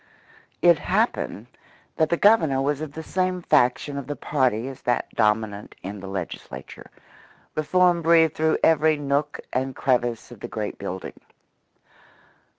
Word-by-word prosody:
It 170 Hz, -3 st, +6 dB
happened 195 Hz, -, -1 dB, 0.5 s
that 160 Hz, -1 st, +2 dB
the 170 Hz, -, +1 dB
Governor 165 Hz, -11 st, +4 dB
was 140 Hz, +2 st, 0 dB
of 155 Hz, -2 st, -5 dB
the 160 Hz, -, -7 dB
same 185 Hz, +1 st, -1 dB
faction 140 Hz, 0 st, +2 dB
of 135 Hz, -, -8 dB
the 145 Hz, -, -3 dB
party 130 Hz, -6 st, 0 dB
as 135 Hz, -1 st, -8 dB
that 120 Hz, -, 0 dB
dominant 105 Hz, -1 st, 0 dB
in 100 Hz, +2 st, -6 dB
the 95 Hz, -, -8 dB
Legislature; 95 Hz, -3 st, -7 dB, 0.6 s
reform 175 Hz, +3 st, +2 dB
breathed 165 Hz, -1 st, +4 dB
through 160 Hz, 0 st, +1 dB
every 160 Hz, -1 st, +4 dB
nook 140 Hz, 0 st, -1 dB
and 130 Hz, +1 st, -1 dB
crevice 120 Hz, -2 st, 0 dB
of 120 Hz, -, -11 dB
the -, -, -6 dB
great 105 Hz, -2 st, -5 dB
building. 95 Hz, -1 st, -5 dB
140 Hz, 145 wpm, -24 LUFS, 120-160 Hz, 0.6 s, It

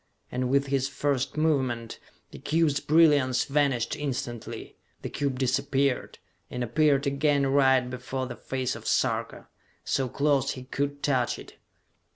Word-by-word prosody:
And 125 Hz, 0 st, -1 dB
with 140 Hz, +1 st, +3 dB
his 135 Hz, -1 st, 0 dB
first 140 Hz, -1 st, -1 dB
movement, 130 Hz, -7 st, 0 dB, 0.3 s
the -, -, -10 dB
cube's 155 Hz, -2 st, +1 dB
brilliance 145 Hz, -6 st, +4 dB
vanished 140 Hz, -5 st, 0 dB
instantly, 130 Hz, -5 st, -5 dB, 0.3 s
the -, -, -5 dB
cube 140 Hz, -2 st, -2 dB
disappeared, 135 Hz, +1 st, 0 dB, 0.3 s
and 125 Hz, -, -3 dB
appeared 140 Hz, +4 st, +2 dB
again 140 Hz, 0 st, +2 dB
right 135 Hz, -2 st, +3 dB
before 130 Hz, +1 st, -4 dB
the 125 Hz, -1 st, -7 dB
face 130 Hz, +2 st, -3 dB
of -, -, -8 dB
Sarka, -, -, -1 dB, 0.4 s
so 135 Hz, -2 st, 0 dB
close 140 Hz, 0 st, +1 dB
he 130 Hz, -, -8 dB
could 140 Hz, +2 st, -3 dB
touch 130 Hz, -4 st, +1 dB
it! -, -, -13 dB
135 Hz, 140 wpm, -27 LUFS, 130-145 Hz, 0.4 s, brilliance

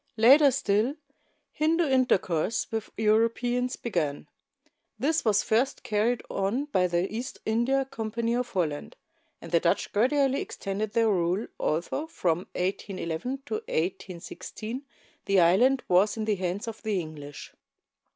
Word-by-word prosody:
Later 275 Hz, +6 st, +7 dB
still, 220 Hz, +2 st, +1 dB, 0.6 s
Hindu 325 Hz, +2 st, +1 dB
intercourse 225 Hz, -, +1 dB
with 225 Hz, -1 st, -3 dB
Europeans 230 Hz, +3 st, +1 dB
began. 160 Hz, -11 st, -2 dB, 0.7 s
This 305 Hz, +8 st, +1 dB
was 210 Hz, -2 st, +3 dB
first 240 Hz, +5 st, +1 dB
carried 225 Hz, +3 st, 0 dB
on 200 Hz, +9 st, -1 dB
by 185 Hz, -11 st, +1 dB
the 175 Hz, +1 st, 0 dB
East 245 Hz, +3 st, -5 dB
India 245 Hz, +5 st, +1 dB
Company 230 Hz, -1 st, -2 dB
of 245 Hz, 0 st, -1 dB
Holland; 160 Hz, -6 st, -2 dB, 0.5 s
and 170 Hz, -, -9 dB
the 170 Hz, -, +4 dB
Dutch 170 Hz, -, 0 dB
gradually 270 Hz, +5 st, +2 dB
extended 200 Hz, +2 st, -4 dB
their 230 Hz, -1 st, +3 dB
rule, 180 Hz, +2 st, +1 dB
although 175 Hz, -, -1 dB
from 175 Hz, -, -1 dB
1811 190 Hz, +6 st, -3 dB
to -, -, -6 dB
1816 215 Hz, -, -4 dB, 0.4 s
the 195 Hz, -1 st, +3 dB
island 240 Hz, +10 st, +4 dB
was 195 Hz, +5 st, +3 dB
in 220 Hz, -, -2 dB
the 215 Hz, -, +2 dB
hands 185 Hz, +4 st, -3 dB
of 225 Hz, -1 st, -6 dB
the 215 Hz, -4 st, -1 dB
English. 150 Hz, -3 st, -8 dB
220 Hz, 130 wpm, -27 LUFS, 180-250 Hz, 0.7 s, Later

